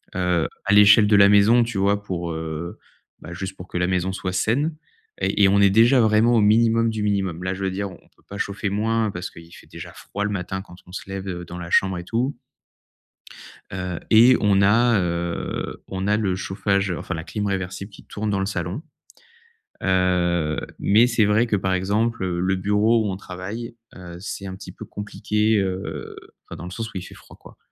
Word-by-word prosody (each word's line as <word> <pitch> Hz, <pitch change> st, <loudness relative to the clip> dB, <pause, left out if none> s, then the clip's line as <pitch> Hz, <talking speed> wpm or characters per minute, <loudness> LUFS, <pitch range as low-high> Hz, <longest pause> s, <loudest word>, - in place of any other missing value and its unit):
heu, 90 Hz, -3 st, +1 dB, 0.2 s
à 100 Hz, -, +2 dB
l'échelle 105 Hz, +1 st, +7 dB
de 105 Hz, -, +4 dB
la 100 Hz, 0 st, +7 dB
maison, 105 Hz, +4 st, +5 dB
tu 115 Hz, -3 st, -4 dB
vois, 100 Hz, +1 st, +2 dB
pour, 85 Hz, -3 st, -4 dB
heu 80 Hz, +1 st, -5 dB, 0.4 s
bah, 85 Hz, -, -9 dB
juste 95 Hz, +2 st, -6 dB
pour 90 Hz, -, -10 dB
que -, -, -5 dB
la 90 Hz, 0 st, +1 dB
maison 95 Hz, 0 st, 0 dB
soit 95 Hz, -1 st, -4 dB
saine 140 Hz, -, 0 dB, 0.5 s
et 105 Hz, -, +1 dB
et 95 Hz, -, +8 dB
on 100 Hz, +1 st, +4 dB
est 100 Hz, -, +6 dB
déjà 115 Hz, +6 st, +5 dB
vraiment 110 Hz, +2 st, +4 dB
au 110 Hz, -, +4 dB
minimum 115 Hz, +2 st, +4 dB
du 110 Hz, -2 st, -3 dB
minimum. 95 Hz, -4 st, -1 dB
Là, 95 Hz, 0 st, -1 dB
je 95 Hz, +1 st, -6 dB
veux 95 Hz, -, +1 dB
dire, 100 Hz, +1 st, -3 dB
on -, -, -11 dB
on -, -, -22 dB
peut -, -, -28 dB
pas 100 Hz, -, -7 dB
chauffer 100 Hz, 0 st, -2 dB
moins, 110 Hz, +1 st, 0 dB
parce 90 Hz, 0 st, -6 dB
qu'il 85 Hz, 0 st, -14 dB
fait -, -, -16 dB
déjà -, -, -10 dB
froid 100 Hz, +1 st, -6 dB
le 105 Hz, -, -2 dB
matin 95 Hz, 0 st, -4 dB
quand 90 Hz, -, -14 dB
on -, -, -14 dB
se 95 Hz, -, -7 dB
lève, 95 Hz, 0 st, -5 dB
heu, 90 Hz, -2 st, -5 dB
dans 90 Hz, +2 st, -8 dB
la 85 Hz, -, -7 dB
chambre 95 Hz, -1 st, +3 dB
et -, -, -7 dB
tout 120 Hz, +7 st, -1 dB, 1.4 s
heu 90 Hz, -2 st, -4 dB
et 120 Hz, +3 st, +7 dB
on 100 Hz, -2 st, +3 dB
a, 115 Hz, +2 st, +4 dB
heu, 85 Hz, -1 st, -3 dB
on 95 Hz, +1 st, -4 dB
a 105 Hz, -, +3 dB
le 95 Hz, -4 st, 0 dB
chauffage, 100 Hz, +1 st, -1 dB
enfin, 90 Hz, -, -4 dB
la 80 Hz, 0 st, -5 dB
clim 105 Hz, +3 st, -4 dB
réversible 95 Hz, +1 st, -4 dB
qui 100 Hz, -, -15 dB
tourne 105 Hz, +1 st, -4 dB
dans 100 Hz, -2 st, 0 dB
le 95 Hz, -, 0 dB
salon. 90 Hz, -, -3 dB, 1.0 s
Heu 90 Hz, -4 st, +1 dB, 0.2 s
mais 110 Hz, +4 st, +5 dB
c'est 115 Hz, -3 st, +2 dB
vrai 105 Hz, +4 st, +3 dB
que, 110 Hz, -, +1 dB
par 95 Hz, -1 st, 0 dB
exemple, 105 Hz, +3 st, 0 dB
le 90 Hz, +1 st, 0 dB
bureau 105 Hz, +4 st, +2 dB
où -, -, -1 dB
on 95 Hz, -, -4 dB
travaille, 100 Hz, +6 st, -7 dB, 0.2 s
heu, 90 Hz, -2 st, -10 dB
c'est 100 Hz, 0 st, -6 dB
un 95 Hz, -, -6 dB
petit 95 Hz, -, -10 dB
peu -, -, -10 dB
compliqué, 105 Hz, +1 st, -1 dB
heu, 90 Hz, -7 st, -4 dB, 0.3 s
enfin, -, -, -8 dB
dans 85 Hz, -, -8 dB
le 90 Hz, -, -7 dB
sens 110 Hz, +3 st, -4 dB
où 95 Hz, -, -7 dB
il -, -, -4 dB
fait -, -, -12 dB
froid, -, -, -16 dB
quoi. -, -, -16 dB
100 Hz, 220 wpm, -23 LUFS, 90-105 Hz, 1.4 s, et